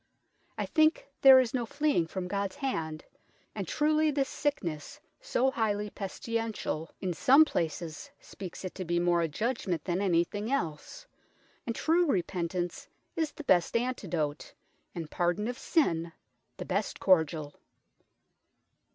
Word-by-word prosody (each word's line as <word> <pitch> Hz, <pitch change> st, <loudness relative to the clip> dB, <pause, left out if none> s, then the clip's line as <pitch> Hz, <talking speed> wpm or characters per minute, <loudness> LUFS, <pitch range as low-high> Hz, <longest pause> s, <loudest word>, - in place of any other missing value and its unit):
I -, -, -1 dB
thinke 310 Hz, +1 st, +3 dB, 0.2 s
there 265 Hz, -1 st, +10 dB
is 250 Hz, -3 st, 0 dB
no 245 Hz, -3 st, -1 dB
fleeing 285 Hz, -, +1 dB
from 180 Hz, +1 st, -4 dB
God's 200 Hz, 0 st, -2 dB
hand, 160 Hz, -, -3 dB, 0.5 s
and -, -, -4 dB
truely 310 Hz, +1 st, +2 dB
this 275 Hz, -2 st, 0 dB
sicknes 280 Hz, -, -3 dB, 0.2 s
so 265 Hz, -, +1 dB
highly 210 Hz, -3 st, -1 dB
pesti 200 Hz, +3 st, -6 dB
lential 215 Hz, -8 st, -3 dB
in 185 Hz, -2 st, -1 dB
some 275 Hz, -, +6 dB
places 165 Hz, -, -3 dB
speakes 185 Hz, 0 st, -9 dB
it 185 Hz, -, -5 dB
to 190 Hz, -, -5 dB
be 175 Hz, 0 st, 0 dB
more 175 Hz, 0 st, +2 dB
a 165 Hz, -, +1 dB
judgment 195 Hz, -, -2 dB
than 180 Hz, +1 st, 0 dB
anything 200 Hz, +4 st, 0 dB
else, 170 Hz, -, -3 dB, 0.6 s
and 230 Hz, -, -2 dB
true 340 Hz, +2 st, +2 dB
repentance 175 Hz, -, -2 dB, 0.3 s
is 320 Hz, -2 st, -1 dB
the 305 Hz, -, -8 dB
best 185 Hz, -, +3 dB
antidote, 180 Hz, -12 st, -3 dB, 0.4 s
and 165 Hz, -3 st, -6 dB
pardon 175 Hz, +5 st, 0 dB
of 245 Hz, +1 st, -4 dB
sin 170 Hz, -, +1 dB, 0.5 s
the -, -, -6 dB
best 200 Hz, +3 st, -2 dB
cordiall." 160 Hz, -5 st, +2 dB
195 Hz, 140 wpm, -30 LUFS, 170-265 Hz, 0.6 s, there